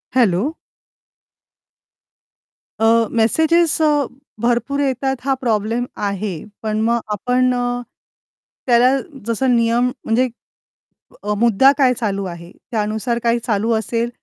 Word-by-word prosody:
Hello. 230 - +2 2.3
अ, 225 0 +4
messages 320 +9 +2
अ, 310 - +4 0.5
भरपूर 240 +4 0
येतात 265 -1 0
हा 275 - +2
प्रॉब्लेम 230 0 0
आहे, 200 -4 -3 0.2
पण 215 0 -1
मग 235 +1 +2
आपण 250 +4 +1
अ, 245 0 -1 0.9
त्याला 240 0 +5 0.4
जसं 245 +2 +1
नियम 235 +1 +2 0.2
म्हणजे 245 +3 +2 1.0
अ, 210 +1 -1
मुद्दा 235 +4 +5
काय 260 -3 +4
चालू 200 -5 -2
आहे? 170 -1 -8 0.2
त्यानुसार 220 +1 -1
काय 235 0 +2
चालू 220 0 0
असेल, 230 +2 -1
235 Hz, 110 wpm, -19 LUFS, 215-250 Hz, 2.3 s, त्याला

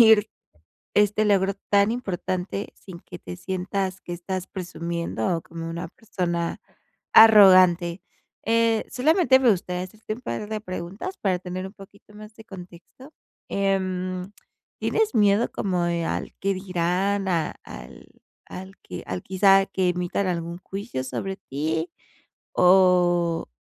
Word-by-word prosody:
presumir 220 -2 +6 0.7
este 210 +1 +3
logro 195 -1 +2 0.2
tan 200 +1 +4
importante, 190 -3 -4
sin 180 -3 -12
que 175 0 -11
te - - -8
sientas 190 +1 -3
que 175 - -6
estás 185 +1 -5
presumiendo, 170 - -3
o - - -6
como 165 0 -7
una 170 +1 -5
persona 170 -4 -3 0.6
arrogante. 185 -5 +7 0.4
Eh, 230 0 +2
solamente 300 +1 +4
me 260 -3 +4
gustaría 180 -2 -1
hacer 210 +4 -14
este 220 - -5
un 220 - -6
par 165 - -4
de 215 0 -4
preguntas, 195 - -6
para 185 -3 0
tener 185 +1 -5
un 190 - -10
poquito 200 0 -16
más 215 +1 -12
de 220 - -14
contexto. 190 - -13 0.4
Em, 185 -1 -1 0.5
¿tienes 440 -8 0
miedo 210 0 +3
como 180 -3 -1
de 170 -1 -1
al - - -3
qué 195 0 0
dirán, 190 +2 -1
a 165 -4 0
al - - -11 0.4
al 190 +1 -9
que 90 - -8
al 90 0 -4
quizá, 195 +1 +4
que 185 -2 0
emitan 180 +2 -2
algún 170 -1 -3
juicio 195 - -5
sobre 190 +8 -4
ti? 160 +2 -3 0.6
¿O 180 -2 +4
185 Hz, 140 wpm, -24 LUFS, 175-205 Hz, 0.7 s, arrogante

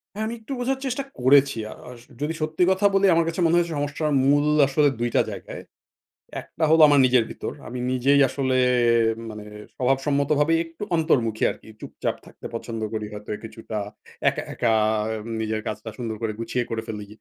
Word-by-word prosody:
হ্যাঁ, 215 - -2
আমি 230 - -3
একটু 225 +5 -8
বোঝার 260 +2 -1
চেষ্টা 265 +1 -2 0.2
করেছি। 135 0 +4
আ - - -9 0.2
আ - - -8 0.3
যদি 150 +2 -1
সত্যি 155 +3 -1
কথা 190 +2 +3
বলি 195 0 +4
আমার 165 - +3
কাছে 165 +2 -3
মনে 165 - +3
হয়েছে 170 -1 +1
সমস্যার 145 +2 -2 0.2
মূল 145 +1 +4 0.2
আসলে 145 +2 +3
দুইটা 120 0 +1
জায়গায়। - - -8 0.8
একটা 160 - -6
হলো 160 - +6
আমার 145 -1 +5
নিজের 125 -2 +4
ভিতর। - - -5 0.2
আমি 125 +2 -6
নিজেই 135 +3 +3
আসলে 130 -1 -1 0.7
মানে 105 -1 -8 0.3
স্বভাব 135 +1 +2
সম্মতভাবে 145 +2 +2
একটু 165 +4 -9
অন্তর্মুখী 120 -9 +1
আরকি। - - -14
চুপচাপ - - -4
থাকতে - - -15
পছন্দ 115 -1 -5
করি। 110 -1 -3
হয়তো 105 0 -9
কিছুটা 110 -1 -7 0.5
একা, - - -4
একা 115 -2 +1 0.7
নিজের 110 0 -2
কাজটা 110 +1 -5
সুন্দর 115 -3 -4
করে 110 -1 -2
গুছিয়ে 120 +2 -1
করে 115 -1 -2
ফেলি। 105 -2 -6
140 Hz, 175 wpm, -24 LUFS, 115-160 Hz, 0.8 s, হলো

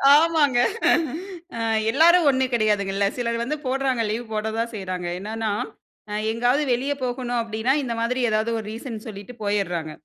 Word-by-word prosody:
ஆமாங்க. 305 -5 +4 1.0
ஆ - - -4 0.3
எல்லாரும் 330 +4 +5
ஒன்னு 260 -1 +2
கிடையாதுங்கல்ல. 200 -3 +1
சிலர் 235 -1 -1
வந்து 300 +5 -2
போடுறாங்க 265 -2 0
லீவ் 235 +2 -3
போட 215 0 -1
தான் 235 +1 -1
செய்றாங்க. 185 -3 -4
என்னன்னா, 220 +2 -3 0.6
அ - - -5 0.2
எங்கேயாவது 245 +5 +2
வெளிய 260 +4 -1
போகணும் 245 -1 -2
அப்பிடின்னா 230 +4 0
இந்த 235 -2 -2
மாதிரி 250 +2 0
எதாவது 220 +2 +1
ஒரு 210 - -7
ரீசன் 225 -2 -7
சொல்லிட்டு 205 +4 -9
போயிட்றாங்க. 180 -6 -1
235 Hz, 150 wpm, -24 LUFS, 215-260 Hz, 1.0 s, எல்லாரும்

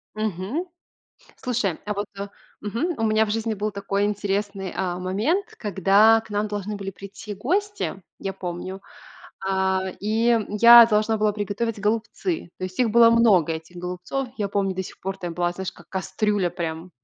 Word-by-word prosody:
Мгм. 215 - -2 0.7
Слушай, 225 -9 -1
а 210 - -1
вот 205 +1 -3 0.5
Мгм. 235 - -2
У - - -2
меня 220 0 +3
в - - -4
жизни 225 +1 -1
был 210 +1 -2
такой 200 0 -1
интересный, 200 -1 -2
э, 180 -1 -2
момент, 215 - -1
когда 205 +3 +4
к 225 - -18
нам 205 +1 -1
должны 205 0 -4
были 195 -1 -5
прийти 200 +2 -9
гости, 370 - -2 0.2
я 195 - -4
помню, 185 +1 -6 0.7
э, 190 -1 0
и, 220 +3 +1
м, 230 -3 +3
я 235 +3 +9
должна 220 0 +2
была 210 -1 +2
приготовить 210 +2 -3
голубцы. 225 - -2
То 185 - -4
есть, 185 0 -7
их 245 -3 +3
было 235 +1 +7
много, 210 -9 +4
этих 160 +2 -8
голубцов. 180 +9 -4
Я 205 -2 -1
помню 195 -1 0
до 190 - -2
сих - - -11
пор 195 0 -4
там 175 -3 -5
была, 175 +1 0
знаешь, 185 +1 -5
как - - -18
кастрюля 190 0 0
прям. 165 +1 -5
205 Hz, 175 wpm, -24 LUFS, 190-220 Hz, 0.7 s, я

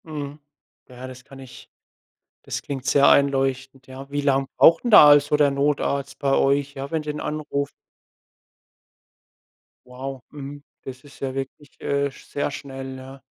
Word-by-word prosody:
Mhm. 150 -2 -7 0.5
Ja, 125 +1 -10
das 130 -1 -11
kann 135 +1 -14
ich 130 -2 -13 0.7
das - - -5
klingt 135 -2 -6
sehr 140 0 +5
einleuchtend, 135 -1 +1
ja. 135 +1 -10
Wie 145 0 -1
lang 135 -1 +1
braucht 165 +5 +6
'n 240 - 0
da 150 -8 +9
also 145 0 +5
der 145 -1 +3
Notarzt 140 0 -1
bei 140 -1 +1
euch, 140 +1 +1
ja, 135 +1 -6
wenn 160 -1 -1
den 150 0 -5
anruft? 150 -2 -3 2.2
Wow, 130 0 -8
mhm, 145 0 -9 0.2
das 130 0 -9
ist 145 - -16
ja 135 -1 -3
wirklich, 135 +2 -8
äh, 140 0 -1
sch - - -16
sehr 145 0 -2
schnell, 135 -1 -8
ja. 135 +1 -12
140 Hz, 155 wpm, -23 LUFS, 135-145 Hz, 2.2 s, da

